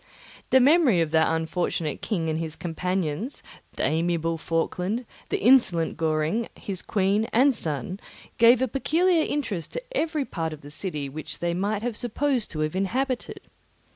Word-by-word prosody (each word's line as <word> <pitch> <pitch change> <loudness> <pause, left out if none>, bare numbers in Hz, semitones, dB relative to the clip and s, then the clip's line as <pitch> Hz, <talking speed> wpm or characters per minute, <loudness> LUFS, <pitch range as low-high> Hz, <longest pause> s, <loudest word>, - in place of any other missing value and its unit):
The 260 - +6
memory 275 - +5
of 160 -2 0
that 160 0 +4
unfortunate 160 -1 -1
king 175 -7 -1
and 160 0 -1
his 160 -1 -4
companions, 180 - -3 0.3
the - - -3
amiable 165 0 0
Falkland, 180 +9 -1 0.2
the - - 0
insolent 200 -9 +4
Goring, 160 +8 0
his 190 -3 -5
queen, 200 +1 +1
and 265 +4 +5
son, 160 - -2 0.4
gave 235 +2 +6
a - - +2
peculiar 325 +7 +2
interest 215 - -3
to - - -4
every 315 - 0
part 160 -7 -3
of 155 - -10
the 145 - -11
city 150 -4 -3
which 150 +3 -6
they 170 0 -1
might 200 +4 -1
be 245 -1 -1
supposed 245 +2 -1
to 155 - -4
have 155 +2 -1
inhabited. 250 +7 -2
185 Hz, 160 wpm, -25 LUFS, 160-245 Hz, 0.4 s, The